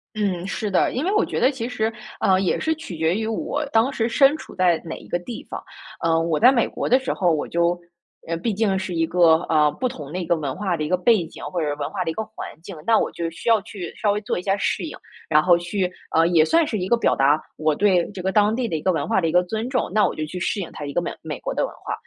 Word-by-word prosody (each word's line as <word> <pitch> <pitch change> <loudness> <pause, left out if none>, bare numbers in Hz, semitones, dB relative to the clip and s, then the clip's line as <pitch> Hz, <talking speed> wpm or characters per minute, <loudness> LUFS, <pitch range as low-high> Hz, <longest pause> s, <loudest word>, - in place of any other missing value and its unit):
嗯， 190 -4 -1
是 210 +1 -3
的， 190 - +2
因 265 +6 -1
为 385 - +1
我 425 - +3
觉 - - -3
得 260 - +4
其 245 -3 -4
实， 225 -3 -1 0.3
呃， 190 -1 +3
也 185 - +1
是 320 0 +1
取 245 - -8
决 160 +2 +1
于 220 +1 -2
我 255 +6 -2
当 230 +5 +3
时 225 -2 0
身 275 +4 +5
处 - - -12
在 175 -3 +2
哪 165 - -6
一 - - -13
个 175 - -1
地 220 +6 -8
方。 - - -6 0.4
呃， 165 -1 +3
我 165 -2 0
在 250 - +7
美 245 -4 +2
国 - - -4
的 255 - +6
时 265 - -2
候， 180 -2 +2
我 155 -2 -1
就， 170 +1 +1 0.5
呃， 165 - -1
毕 225 +6 -1
竟 205 -2 +1
是 190 -2 -4
一 165 0 +2
个， 170 -1 +5
呃 150 -2 +4
不 255 - -1
同 150 - -8
的 180 - -4
一 180 - -3
个 170 - +2
文 145 -4 -3
化 190 -3 -1
的 155 - -3
一 150 - -3
个 180 - +2
背 210 -1 +3
景， - - -12
或 175 -2 -3
者 155 - -1
是 145 - -1
文 145 -1 -3
化 190 -3 -2
的 165 - -3
一 - - -2
个 220 - -2
环 220 - -8 0.2
境， 190 - -8
那 225 -1 +5
我 - - 0
就 170 -1 -3
需 165 +8 -4
要 220 -3 +5
去 195 -5 -8
稍 205 - +3
微 205 - 0
做 210 - -2
一 - - -5
下 195 +1 0
适 - - -1
应， - - -6 0.3
然 150 -1 +4
后 175 -1 +6
去 180 +1 -2 0.2
呃， 165 +1 +5
也 170 -3 +5
算 330 - +3
是 220 -7 -2
一 185 - -2
个 235 - +3
表 - - +2
达 145 +3 +3 0.2
我 155 -1 +1
对 185 -3 +2
这 195 - -9
个 190 - 0
当 210 +2 +3
地 245 -1 -1
的 170 - -2
一 155 - -2
个 185 - +2
文 160 -5 -2
化 220 -4 +2
的 165 - +1
一 - - 0
个 180 +2 +4
尊 220 +6 -3
重， 255 -7 -1
那 215 0 +4
我 - - -4
就 155 - -3
去 180 +4 -6
适 195 - -1
应 185 - -5
它 150 - -6
一 140 - -5
个 175 - 0
美 - - -3
美 - - -6
国 - - -3
的 - - 0
文 - - -12
化。 - - -2
185 Hz, 330 characters per minute, -23 LUFS, 165-220 Hz, 0.5 s, 在